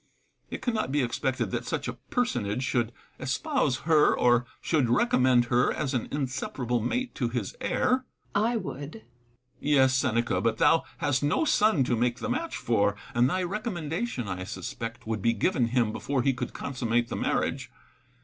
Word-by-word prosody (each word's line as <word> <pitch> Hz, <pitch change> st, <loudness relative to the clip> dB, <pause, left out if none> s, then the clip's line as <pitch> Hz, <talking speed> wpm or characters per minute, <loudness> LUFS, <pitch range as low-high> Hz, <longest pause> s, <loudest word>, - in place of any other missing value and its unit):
It -, -, -6 dB
cannot 225 Hz, -, -1 dB
be 145 Hz, -1 st, +2 dB
expected 130 Hz, +2 st, -1 dB
that -, -, -3 dB
such -, -, -2 dB
a -, -, -3 dB
personage 125 Hz, -, -2 dB
should 120 Hz, -3 st, 0 dB, 0.3 s
espouse 140 Hz, -, 0 dB
her, 155 Hz, -2 st, +4 dB
or 120 Hz, 0 st, +3 dB
should 145 Hz, -8 st, +1 dB
recommend 125 Hz, -, +4 dB
her 120 Hz, 0 st, +2 dB
as 145 Hz, -2 st, -2 dB
an 125 Hz, -, -1 dB
inseparable 130 Hz, -3 st, -2 dB
mate 250 Hz, -, -2 dB
to 120 Hz, -4 st, -1 dB
his 115 Hz, -5 st, -3 dB
heir. -, -, 0 dB
Seneca. 255 Hz, 0 st, +1 dB, 0.4 s
I 240 Hz, -, 0 dB
would. 190 Hz, -, -4 dB
Epictetus. 115 Hz, -5 st, -12 dB, 0.5 s
Yes, 135 Hz, -3 st, +4 dB
Seneca, 120 Hz, -3 st, +1 dB
but 115 Hz, -1 st, +1 dB
thou 165 Hz, -, +4 dB
hast 145 Hz, -4 st, +1 dB
no 145 Hz, -, +1 dB
son 210 Hz, -, +3 dB
to 120 Hz, -, +1 dB
make 120 Hz, +1 st, +1 dB
the 255 Hz, -, -4 dB
match 325 Hz, +7 st, -2 dB
for; 100 Hz, -3 st, +1 dB, 0.2 s
and 120 Hz, +2 st, +3 dB
thy 185 Hz, +5 st, 0 dB
recommendation, 175 Hz, -, -3 dB
I 90 Hz, -1 st, -4 dB
suspect, 115 Hz, +4 st, -6 dB
would 110 Hz, -2 st, -2 dB
be 115 Hz, +3 st, +3 dB
given 120 Hz, -, +1 dB
him 120 Hz, -2 st, +1 dB
before 130 Hz, +3 st, -1 dB
he 135 Hz, -, +3 dB
could 125 Hz, -1 st, -4 dB
consummate 120 Hz, -3 st, -1 dB
the -, -, -3 dB
marriage. -, -, -1 dB
130 Hz, 175 wpm, -27 LUFS, 120-160 Hz, 0.5 s, her